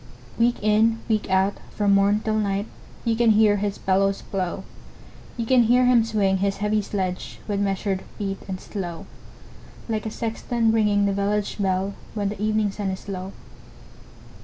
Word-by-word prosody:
Week 240 +1 +3
in, 220 +2 +3
week 215 -3 0
out, 190 +1 +2 0.2
from 205 -1 +2
morn 200 +2 +3
till 215 0 0
night, 200 -1 0 0.4
You 230 -1 +2
can 235 0 +3
hear 210 -1 +5
his 205 0 -2
bellows 195 +1 +1
blow; 190 -1 -3 0.7
You 230 - -2
can 255 +1 +5
hear 250 +2 +4
him 245 -2 +5
swing 205 -4 +1
his 195 +1 0
heavy 210 +1 +1
sledge, 185 -3 -4
With 205 -2 -1
measured 195 -1 -1 0.2
beat 195 -2 -3
and 185 -1 -4
slow, 175 -5 -6 0.8
Like 220 -1 -2
a - - -2
sexton 225 +1 -1
ringing 210 -2 +3
the 200 - +1
village 200 +1 -1
bell, 190 0 0 0.2
When 205 -2 0
the 205 -1 -6
evening 215 -1 +1
sun 200 -1 -3
is 190 +1 -6
low. 190 -1 -5
205 Hz, 165 wpm, -24 LUFS, 195-220 Hz, 0.8 s, hear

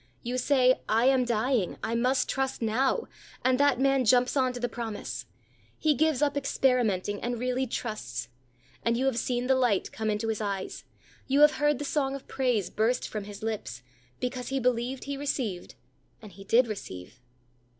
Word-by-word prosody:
You 250 +1 -2
say, 255 -1 +4
"I 225 +3 +3
am 260 -1 +4
dying: 235 -3 0
I 230 - -1
must 250 +3 +2
trust 270 -1 -1
now," 255 - +1 0.4
and 255 0 +3
that 285 -3 +3
man 270 -1 +3
jumps 250 +3 +3
on 260 -2 +2
to 245 - -6
the 245 - 0
promise. 230 -2 -5 0.5
He 310 -1 +3
gives 300 0 +2
up 285 -1 +1
experimenting, 240 -8 +1
and 240 0 -2
really 255 +2 -1
trusts; 125 - -4 0.6
and 230 0 +1
you 260 - 0
have 260 -3 +1
seen 245 0 -1
the 265 - +4
light 245 -7 +1
come 220 -1 -2
into 215 +2 -1
his 220 -1 -2
eyes; 195 -2 -4 0.4
you 275 +2 +3
have 300 +1 +6
heard 295 -1 +3
the 290 - -4
song 275 -2 0
of 275 - -9
praise 245 -8 0
burst 230 +4 +1
from 210 -2 -5
his 205 0 -9
lips, 120 - -4 0.4
because 250 0 -3
he 270 0 -1
believed 250 +1 0
he 280 0 -4
received, 255 -10 -3 0.4
and 215 -3 -12
he 195 0 -13
did 240 +5 +5
receive. 125 - -8
245 Hz, 180 wpm, -28 LUFS, 220-265 Hz, 0.6 s, have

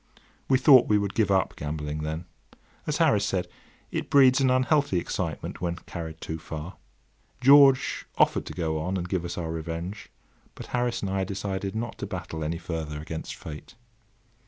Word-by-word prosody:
We 130 - +5
thought 130 -1 +7
we 105 - +4
would 100 -1 -1
give 110 -3 +2
up 95 -1 +2
gambling 75 0 -4
then. 80 +2 -4 0.6
As 150 - 0
Harris 150 -12 +3
said, 95 -3 -1 0.4
it - - -3
breeds 135 -1 +6
an 130 - +4
unhealthy 130 - +2
excitement 85 -3 -3
when 85 -1 -1
carried 80 -2 -8
too 80 0 -5
far. 80 +2 -7 0.6
George 135 0 +5
offered - - +2
to - - -6
go 80 -3 -1
on 90 +5 -2
and 90 -1 -3
give 90 -1 -1
us 85 - -5
our 80 -2 -3
revenge; 85 +5 -5 0.5
but - - -8
Harris 120 -2 0
and 95 - -2
I 95 0 0
decided 95 +1 -4
not 115 +1 -4
to - - -4
battle 80 -1 -5
any 80 +2 -2
further 80 -3 -5
against 80 +1 -6
Fate. 75 -1 -10
90 Hz, 175 wpm, -26 LUFS, 80-115 Hz, 0.6 s, thought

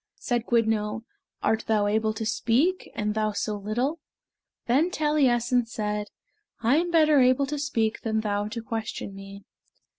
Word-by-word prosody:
Said 240 -3 -2
Gwyddno, 220 -2 +1 0.4
"Art 220 0 +1
thou 215 -2 +2
able 215 +1 +1
to 220 - -4
speak, 275 +12 +1
and 210 0 -1
thou 215 -1 0
so 210 +1 -2
little?" 240 +10 -2 0.7
Then 280 +9 +3
Taliessin 255 -7 +2
said, 210 -2 -3 0.5
"I 240 +5 +3
am 345 +2 +1
better 310 -3 +5
able 255 +2 +4
to 295 +1 -4
speak 230 -6 -1
than 220 -1 0
thou 205 -1 -1
to 230 +1 -6
question 225 -3 -4
me." 195 0 -10
225 Hz, 150 wpm, -26 LUFS, 215-265 Hz, 0.7 s, better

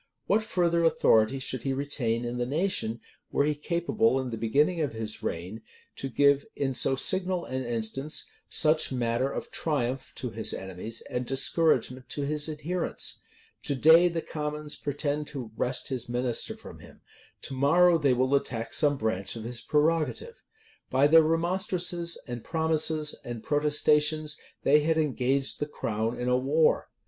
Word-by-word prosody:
What 210 +3 +2
further 170 -5 +1
authority 115 -6 +3
should 130 -2 -3
he 135 - -1
retain 125 -4 -1
in 120 +1 -4
the 120 - 0
nation, 140 - -1 0.3
were - - +2
he 150 - +1
capable, 170 +4 0
in 130 -2 -4
the - - -3
beginning 145 +10 +1
of 145 -6 -1
his 110 -1 -5
reign, 90 +7 -5 0.4
to 135 - -4
give, 140 +2 +3
in 135 -2 -1
so 130 +2 +3
signal 185 +4 0
an 130 0 -3
instance, 120 +5 -2 0.2
such 155 -1 +2
matter 125 +1 0
of - - -6
triumph 135 -4 -2
to 125 -3 -4
his 110 0 -1
enemies, 95 +4 -6
and 125 0 -4
discouragement 130 -2 +1
to 145 - -3
his 150 +2 -1
adherents? 155 +4 -3 0.4
To 140 - -1
day 160 +6 +6
the 170 -1 -3
commons 150 -1 -3
pretend 145 +1 -3
to 125 -7 -7
wrest 125 +4 -1
his 125 -2 -4
minister 120 0 -2
from - - -12
him: - - -16 0.4
to - - -4
morrow 165 +6 +4
they 140 -4 +3
will 130 +2 +1
attack 115 -4 -1
some 145 -2 +2
branch 110 -4 -2
of 115 - -7
his 120 0 -5
prerogative. 165 - 0 0.5
By 130 +2 +3
their 160 +2 +7
remonstrances, 170 +1 0
and 120 -2 -6
promises, 160 -1 +1
and 120 -2 -7
protestations, 150 +1 +2 0.3
they 145 +2 +5
had 160 +2 +1
engaged 135 -2 0
the 150 - -2
crown 115 -4 -3
in 125 - -2
a 125 - +3
war. 150 +5 +2
140 Hz, 160 wpm, -28 LUFS, 125-160 Hz, 0.5 s, their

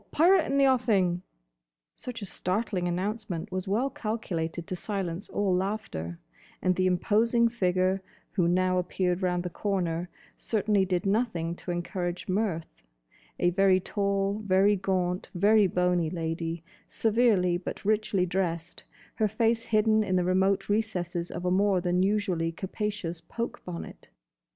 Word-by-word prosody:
Pirate 345 +2 +4
in 275 - 0
the 275 - +5
offing!" 205 -9 +2 0.7
Such 235 -4 -7
a - - -3
startling 185 0 -1
announcement 190 0 -3
was 185 0 -3
well 235 +8 +1
calculated 175 -7 -3
to 185 - -4
silence 190 -2 -4
all 200 -2 0
laughter; 180 - -3 0.4
and 185 0 +1
the 185 0 +2
imposing 225 +6 +3
figure 185 -3 +1 0.3
who 180 -4 +1
now 185 +1 +2
appeared 180 0 -1
round 180 -1 0
the 180 - -4
corner 175 -4 -1 0.3
certainly 210 -3 +1
did 180 +1 -1
nothing 195 -6 0
to - - -10
encourage 175 0 -3
mirth: 185 - -2 0.6
a 175 - +3
very 190 0 +4
tall, 200 +1 -1
very 200 +1 +4
gaunt, 185 -1 -1
very 205 +3 +5
bony 180 -2 +1
lady, 165 0 -3 0.2
severely 215 -6 +2
but 180 - -7
richly 215 -3 +2
dressed; 175 -2 -2 0.3
her 215 - +1
face 225 +2 +1
hidden 215 0 +3
in 185 -3 0
the 180 - +3
remote 190 +2 +2
recesses 180 -5 -1
of 180 - -5
a 180 - +2
more 195 0 +3
than 180 0 +1
usually 190 -4 +1
capacious 190 -1 -4
poke 235 +7 -5
bonnet. 175 -2 -8
185 Hz, 140 wpm, -28 LUFS, 175-210 Hz, 0.7 s, the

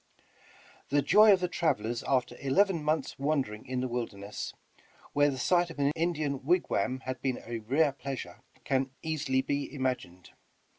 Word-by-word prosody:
The 145 0 +2
joy 210 +8 +7
of 190 -2 +4
the 180 - +1
travelers 120 -10 -1
after 130 -2 +1
eleven 165 +5 +2
mouths' 155 -1 -1
wander 140 -6 0
ing 105 +5 -11
in 130 0 -2
the 130 - -1
wilderness, 105 -4 -4 0.6
where 145 0 +4
the 135 - -3
sight 175 +6 +2
of 165 - -10
an 140 0 +2
Indian 155 -5 -1
wig 175 +5 +2
wam 130 0 0
had 130 -1 -5
been 130 -2 -1
a 115 0 -4
rare 140 +7 +2
pleasure, 135 -1 -6 0.2
can 135 0 0
easily 140 -5 0
be 140 +1 -2
imagined. 130 -10 -3
140 Hz, 165 wpm, -30 LUFS, 130-155 Hz, 0.6 s, joy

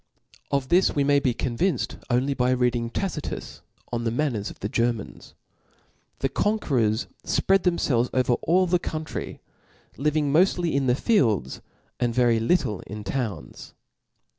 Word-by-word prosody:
Of 140 -2 -1
this 180 +2 +3
we 145 - +2
may 140 0 +4
be 130 -4 0
convinced 130 +4 -1
only 130 +3 +1
by 125 -1 +1
reading 120 -2 0
Tacitius 170 +2 -4 0.3
On 120 -1 -2
the 115 - 0
Man^ 145 +5 0
ners 105 -3 -4
of - - -12
the 100 - -3
Germans. 115 -1 -2 0.9
The 135 - +2
conquerors 135 - 0 0.2
fpread 195 0 +2
them 175 -2 +1
felves 125 -2 +1
over 130 -1 +2
all 185 +3 +3
the 180 0 +2
country; 155 -1 -5 0.6
living 150 0 +1
moftly 175 0 +3
in 135 -1 +1
the 125 - +3
fields, 115 - +1 0.4
and 120 -1 0
very 120 -2 +3
little 115 - +1
in 105 +1 -7
towns. 100 -5 -5
130 Hz, 150 wpm, -25 LUFS, 115-155 Hz, 0.9 s, may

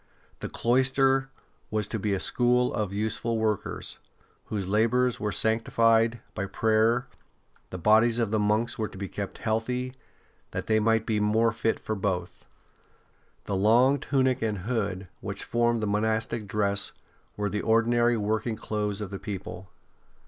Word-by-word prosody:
The - - -5
cloister 135 +2 +2 0.4
was 105 -2 -1
to 110 - -3
be 100 0 0
a - - -2
school 125 +3 +2
of 105 -3 -2
useful 110 +3 -1
workers, 110 -2 -2 0.5
whose 100 -4 -3
labours 115 +4 +2
were 105 0 -1
sanctified 115 +1 +2
by 100 - -3
prayer; 110 +4 +2 0.6
the 95 - -6
bodies 110 +5 +4
of 115 -3 0
the 110 - +2
monks 105 +3 +1
were 110 - 0
to - - -12
be 100 0 -4
kept 100 +1 -6
healthy, 125 +3 -2 0.6
that - - -4
they 110 0 +3
might 115 0 +2
be 110 -2 0
more 110 +2 +3
fit 115 +1 -1
for 110 - -3
both. 95 -4 -3 1.0
The 100 - -2
long 120 +8 +4
tunic 130 -2 +1
and 110 -2 -1
hood 100 -2 -2
which - - -5
formed 120 -1 +1
the - - 0
monastic 110 +1 -1
dress 100 -1 0 0.4
were 105 0 -1
the 105 - -1
ordinary 120 +1 +3
working 110 +2 -1
clothes 105 -1 -2
of 100 -2 -5
the 100 - -5
people. 95 -2 -7
110 Hz, 155 wpm, -27 LUFS, 105-120 Hz, 1.0 s, bodies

